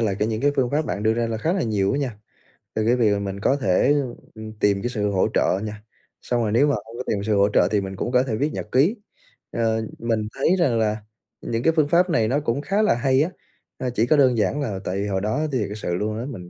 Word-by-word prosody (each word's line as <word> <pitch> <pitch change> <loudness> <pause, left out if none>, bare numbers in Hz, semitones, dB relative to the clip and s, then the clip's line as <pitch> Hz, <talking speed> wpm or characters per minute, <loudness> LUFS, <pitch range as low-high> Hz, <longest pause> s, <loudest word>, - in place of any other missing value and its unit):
là 105 -4 +1
kể 105 - +1
những 110 0 -2
cái 145 - +3
phương 125 -3 +1
pháp 150 +2 0
bạn 105 - -3
đưa 110 +1 +3
ra 120 0 0
là 115 -1 -2
khá 160 +9 0
là 190 -2 0
nhiều 100 -4 0
á 140 - 0
nha. 130 -6 -3 0.6
Từ 110 0 0
cái 120 +2 +4
việc 105 -4 +2
mình 100 -1 -4
có 130 +7 +2
thể, 125 +7 +3 0.4
ừm, 110 0 -8
tìm 100 -1 +2
cái 120 - -2
sự 105 -4 -1
hỗ 95 -1 +2
trợ 95 - +2
nha, 105 -1 -6 0.4
xong 120 -1 -1
rồi 110 -2 0
nếu 135 +7 +4
mà 145 - +2
hông 115 0 -8
có 125 - -4
tìm 100 -2 -1
sự 105 -1 +1
hỗ 100 +1 +4
trợ - - +3
thì 105 -2 +2
mình 95 0 -6
cũng 120 - -3
có 125 0 +4
thể 115 -5 -2
viết 145 +6 -1
nhật - - -6
ký. 150 - +3 0.6
Ờ, 110 -1 0 0.2
mình 115 -2 -1
thấy 135 - +2
rằng 125 -9 +2
là 110 -1 +1 0.4
những 115 +1 -3
cái 165 - +3
phương 155 -3 +3
pháp 175 +3 +3
này 115 -10 +2
nó 135 +5 +1
cũng 140 -1 -1
khá 200 +6 0
là 210 - +3
hay 130 +2 +2
á, 160 - +1 0.5
a, 130 - -2
chỉ 115 -1 +1
có 150 +4 +3
đơn 130 -4 +4
giản 145 +7 0
là 105 -8 -3
tại 95 - -2
vì 100 +1 -2
hồi 95 -1 -1
đó 110 +9 -1
thiệt 110 -7 -1
sự 95 -5 -3
luôn 105 +3 -2
á, 120 - -4
mình 95 -11 -8
115 Hz, 280 wpm, -23 LUFS, 105-135 Hz, 0.6 s, cái